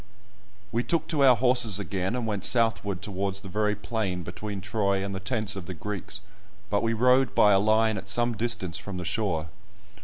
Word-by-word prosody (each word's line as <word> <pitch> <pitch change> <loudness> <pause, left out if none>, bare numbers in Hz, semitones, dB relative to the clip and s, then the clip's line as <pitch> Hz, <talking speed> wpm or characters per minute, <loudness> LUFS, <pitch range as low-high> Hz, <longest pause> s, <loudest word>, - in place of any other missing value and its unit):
We 115 - +1
took 165 +2 0
to 150 -4 +2
our 130 -2 +7
horses 125 -4 +2
again, 95 +1 -2
and 125 -2 -2
went 105 -4 -3
southward 115 -5 +2
towards 100 -1 -3
the 100 - -10
very 105 +2 0
plain 105 -4 -3
between 105 +4 -6
Troy 100 0 0
and 100 - -4
the 95 - -4
tents 105 0 0
of 95 -4 -7
the 95 - -6
Greeks, 100 +2 -5 0.5
but 100 - +2
we 115 0 0
rode 125 +3 +3
by 105 - +6
a 95 - +5
line 110 0 +2
at 95 - -11
some 120 +3 0
distance 110 -7 0
from 100 -2 -7
the 90 - -5
shore. 90 -5 -1
105 Hz, 195 wpm, -27 LUFS, 95-115 Hz, 0.5 s, our